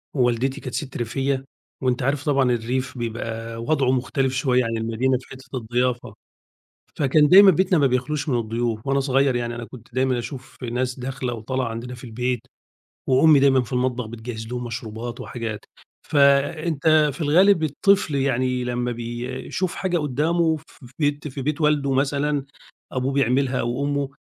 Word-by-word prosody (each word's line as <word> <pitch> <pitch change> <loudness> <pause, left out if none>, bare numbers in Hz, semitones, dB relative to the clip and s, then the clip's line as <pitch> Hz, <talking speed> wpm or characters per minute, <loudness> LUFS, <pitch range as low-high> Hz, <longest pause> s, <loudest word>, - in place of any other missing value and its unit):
ووالدتي 130 +2 +1
كانت 130 - -6
سِتّ 135 -4 -4
ريفية، 135 +3 -1 0.4
وأنت 125 0 +1
عارف 140 +1 0
طبعًا 135 -4 +3
الريف 125 +3 -2
بيبقى 115 0 -4
وضعه 135 -1 +1
مختلف 130 +1 0
شوية 130 -2 +2
عن 115 0 -2
المدينة 115 +3 0
في - - -17
حتة 130 0 -8
الضِّيافة. 120 0 -1 0.8
فكان 150 +1 +4
دايمًا 195 +1 +9
بيتنا 185 +1 +2
ما 140 -2 +4
بيخلوش 135 +4 -1
من 125 - +2
الضيوف، 115 +1 -2
وأنا 140 0 +2
صغير 135 -1 +2
يعني 120 -1 -2
أنا 120 -1 -6
كنت 120 -1 -14
دايمًا 130 -1 +1
أشوف 130 +2 -8
ناس 125 +2 -2
داخلة 130 -1 -3
وطالعة 130 +3 -3
عندنا 120 +2 -6
في 120 - -14
البيت، 125 +1 -2 0.7
وأمي 140 +3 +6
دايمًا 135 -2 +4
في 125 - -7
المطبخ 125 -1 0
بِتِجَهِّز 110 0 -7
لهم 125 0 -4
مشروبات 115 0 -6
وحاجات. 115 -3 -5 0.5
فأنت 150 +2 +3
في 160 - -8
الغالب 170 +3 +4
الطفل 155 +1 +2
يعني 130 -2 0
لمّا 125 0 -2
بيشوف 120 +9 -4
حاجة 180 -2 0
قدّامه 160 +3 +1
ف - - -16 0.2
في 120 - -16
بيت 145 0 0
في 135 0 -6
بيت 150 +3 -2
والده 145 -3 +2
مثلًا، 140 +1 0 0.5
أبوه 130 +1 -1
بيعملها 130 0 +1
أو 120 +4 -1
أمه، 140 -1 -1
130 Hz, 160 wpm, -23 LUFS, 120-145 Hz, 0.8 s, دايمًا